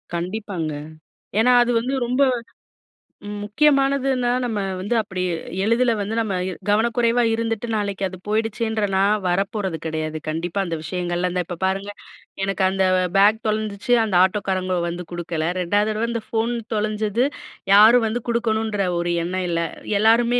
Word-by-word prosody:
கண்டிப்பாங்க. 175 -3 -3 0.7
ஏனா 245 +3 +5
அது 240 - 0
வந்து 255 +3 -3
ரொம்ப 250 +3 +1 1.2
முக்கியமானதுன்னா 270 +1 +2
நம்ம 225 -4 -2 0.2
வந்து 210 +5 -1
அப்டி 190 -4 -3 0.4
எளிதில 235 +3 +3
வந்து 205 +2 -3
நம்ம 215 -4 -1 0.4
கவனக்குறைவா 235 +2 +2
இருந்துட்டு, 225 0 -2
நாளைக்கு 200 -2 -2
அது 185 - -9
போயிடுச்சன்ற 220 0 -1
நா 190 - +3 0.3
வரப்போறது 195 0 -1
கிடையாது. 155 0 -3
கண்டிப்பா 165 +5 -2
அந்த 170 -2 -3
விஷயங்கள்ல 175 +1 -2
இந்த 180 - 0
இப்ப 175 -1 -6
பாருங்க, 195 +2 -1 0.5
எனக்கு 195 0 -1
அந்த 190 0 +1 0.3
பேக் 210 +3 +5
தொலைஞ்சிச்சு, 215 +2 -1
அந்த 210 -4 -1
ஆட்டோக்காரங்க 185 -2 0
வந்து 175 +1 -5
குடுக்கல. 170 -2 -3
2வது 205 +4 +1
தடவை 220 +2 -1
அந்த 230 -1 -2
ஃபோன் 230 +1 0 0.2
தொலைஞ்சது 215 +2 0 0.5
யாரும் 225 +3 +7
வந்து 235 +2 -2
குடுக்கணுன்ற 220 -4 0
ஒரு 175 0 -1
எண்ணம் 185 +1 -2
இல்ல. 170 0 0 0.4
எல்லாருமே 235 +3 +4
210 Hz, 135 wpm, -22 LUFS, 185-230 Hz, 1.2 s, யாரும்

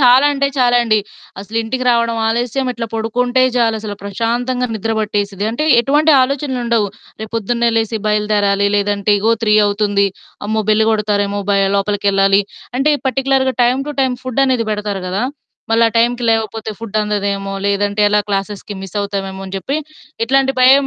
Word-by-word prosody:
చాలా 255 +2 +6
అంటే 280 0 0
చాలా 245 -2 +3
అండి. 220 -2 +2 0.4
అసలు 215 +3 -7
ఇంటికి 255 +3 -3
రావడం 235 -1 +2
ఆలస్యం 245 +3 -1
ఇట్లా 235 -1 -5
పొడుకుంటే 245 +3 0
చాలసలు 220 -3 0
ప్రశాంతంగా 240 +5 -1
నిద్ర 225 +1 -2
పట్టేసిద్ది. 205 -1 -2
అంటే 270 +7 -2 0.2
ఎటువంటి 295 +5 +2
ఆలోచనలుండవు. 255 -5 0 0.4
రేపొద్దున్నే 230 +2 -1
లేసి 225 0 0
బయలుదేరాలి, 210 -1 +1
లేదంటే 205 0 +1
ఇగో 220 +3 +2
3 210 -1 +3
అవుతుంది, 205 -1 +1 0.4
అమ్మో! 220 +1 0
బెల్లు 220 +1 +3
కొడతారేమో 205 -1 0
భయ 195 0 +3
లోపలికెళ్ళాలి. 200 -1 +2 0.4
అంటే, 285 +3 +3
ఈ - - -25
పర్టిక్యులర్‌గా 265 0 +1
టైమ్ 255 +3 +1
టు - - -3
టైమ్ 260 -2 +1
ఫుడ్డనేది 255 -2 +1
బెడతారు 205 -2 -3
గదా! 190 +4 -2 0.5
మళ్ళా 230 0 +4
టైంకి 240 +1 +1
లేవకపోతే 220 0 -1
ఫుడ్డందదేమో 205 -2 -2
లేదంటే 200 +1 0
ఎలా 210 0 +3
క్లాసెస్‌కి 200 +1 -3
మిస్సవుతామేమో 195 0 -4
అని 190 - -8
జెప్పి 270 +9 -2 0.5
ఇట్లాంటి 270 +2 +2
భయం, 270 +2 +6
220 Hz, 145 wpm, -16 LUFS, 205-245 Hz, 0.5 s, చాలా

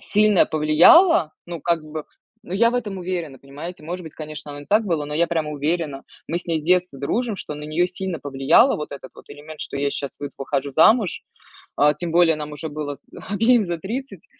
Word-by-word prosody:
сильно 210 -2 +4
повлияло. 155 - +5
Ну, 170 -3 -6
как 170 -1 0
бы, 155 0 -6 0.4
ну, - - -10
я 230 +5 +3
в - - -4
этом 210 -6 -3
уверена, 175 -6 -4
понимаете. 150 +5 -9
Может 180 +3 -5
быть, 160 -3 -10
конечно, 150 -1 -8
оно 145 0 -8
не 145 - -13
так 215 +2 +3
было, 165 -6 -1
но 150 0 -6
я 170 +2 +2
прям 160 -3 -1
уверена. 150 -1 -2 0.2
Мы 170 - -2
с - - -13
ней 165 -2 0
с - - -7
детства 180 -4 +2
дружим, 220 - -1
что 150 - -6
на 150 - -9
неё 155 +4 0
сильно 180 -1 -5
повлияло, 140 - +3
вот 150 - -6
этот 140 -2 -9
вот - - -16
элемент, 150 +1 -11
что - - -4
я 140 0 0
щас 140 -1 -4
выд 145 -1 -6
выхожу 135 0 -2
замуж. 205 - +4 0.5
А, 150 +1 +4
тем 170 +3 -5
более 170 -2 +5
нам 150 0 -6
уже 150 +2 -6
было 145 -1 -5
с - - -28 0.2
обеим 225 +3 +4
за 175 -2 -3
30. 215 +1 -6
160 Hz, 220 wpm, -22 LUFS, 150-185 Hz, 0.5 s, повлияло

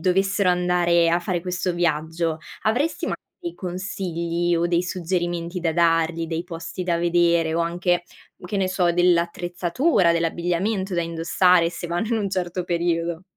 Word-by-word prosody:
dovessero 190 +2 +2
andare 175 -1 +3
a 170 +1 +2
fare 175 0 -2
questo 180 0 -2
viaggio, 165 -1 -1 0.2
avresti 245 - 0
magari 345 -2 -6
consigli 175 -2 -2
o 170 +1 +1
dei 175 0 +1
suggerimenti 175 0 -2
da 165 -2 0
dargli, 165 0 +2
dei 165 +1 -3
posti 165 +1 -6
da 175 -2 0
vedere 170 -1 +2
o 170 - +1
anche, 175 +1 0 0.4
che 195 +3 -3
ne 190 - +1
so, 180 -2 +2
dell'attrezzatura, 175 - +2
dell'abbigliamento 175 +4 -1
da 170 - +1
indossare 170 +1 +3
se 175 0 -6
vanno 175 +6 -2
in 230 - +1
un 205 -2 -1
certo 180 -1 -2
periodo. 170 0 -1
175 Hz, 150 wpm, -23 LUFS, 170-180 Hz, 0.4 s, andare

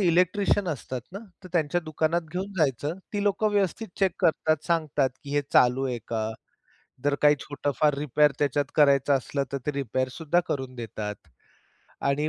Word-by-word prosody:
Electrician 185 +2 +2
असतात 130 -4 -4
ना? 200 - -5 0.3
तर 185 - -8
त्यांच्या 170 0 +1
दुकानात 160 +1 0
घेऊन 190 +3 -3
जायचं. 150 +3 0
ती 205 - -1
लोकं 205 +1 +2
व्यवस्थित 205 +2 0
चेक 190 -3 +3
करतात, 155 0 +3
सांगतात, 150 -5 +1
की 140 - -7
हे 145 - +2
चालू 125 +2 +4
आहे 125 -2 -2
का? 110 -1 -2 0.7
जर 145 0 +3
काही 150 0 +7
छोटं 145 0 -3
फार 150 -1 +4
रिपेअर 150 0 +3
त्याच्यात 145 0 +1
करायचं 140 -1 +4
असलं 140 +2 -2
तर 140 - -1
ते 150 - +1
रिपेअर 130 -2 -1
सुद्धा 165 +4 +1
करून 130 -2 -3
देतात. 105 -2 -5 0.9
आणि 140 +2 +1
150 Hz, 165 wpm, -26 LUFS, 135-175 Hz, 0.9 s, काही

